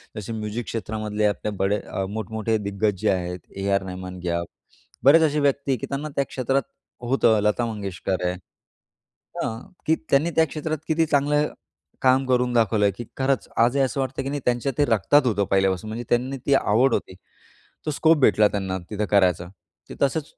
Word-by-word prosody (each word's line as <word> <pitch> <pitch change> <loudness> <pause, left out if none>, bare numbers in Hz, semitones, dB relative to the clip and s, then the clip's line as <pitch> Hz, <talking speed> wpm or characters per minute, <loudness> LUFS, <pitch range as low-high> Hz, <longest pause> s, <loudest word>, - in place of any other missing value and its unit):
जसे 105 +1 -5
म्युझिक 110 +2 -4
क्षेत्रामधले 110 -1 -2
आपल्या 105 +1 -1
बडे 100 +2 +1
अ, 95 - -4
मोठमोठे 110 +1 -2
दिग्गज 100 0 -1
जे - - +2
आहेत, 90 -1 -2 0.2
ए.आर.रहमान 95 -2 -2
घ्या. 85 -1 -1 0.6
बरेच 145 +5 +7
असे 150 -1 +2
व्यक्ती 140 -2 +1
की - - -5
त्यांना 140 +2 -3
त्या 140 - +1
क्षेत्रात 135 +1 0 0.4
होतं 120 -3 +3
लता 105 +3 +1
मंगेशकर 95 -4 -3
आहे. 90 - +1 1.1
हां, 110 0 -3 0.3
की 160 - +3
त्यांनी 150 +5 +3
त्या 160 - +5
क्षेत्रात 155 +2 -3
किती 160 +1 +2
चांगलं 150 0 +2 0.5
काम 130 0 +4
करून 125 -1 +2
दाखवलय 110 -3 +3
की 120 - -6
खरंच, 135 0 0
आजही 120 +4 +3
असं 135 0 0
वाटतं 135 0 -3
की 135 - -3
नाही 145 0 -3
त्यांच्या 125 +2 +1
ते 145 - +4
रक्तात 120 +5 +4
होतं 105 -3 +1
पहिल्यापासून. 95 0 +1
म्हणजे 115 +2 -4
त्यांनी 130 +3 0
ती 140 - +3
आवड 125 +1 +3
होती. - - -2 0.7
तो - - +1
स्कोप 160 +3 +4
भेटला 105 -4 +5
त्यांना 95 -2 -3
तिथं 105 0 -2
करायचा. 90 -4 +3 0.4
ते - - -6
तसंच 140 +2 +1
115 Hz, 170 wpm, -24 LUFS, 100-135 Hz, 1.1 s, बरेच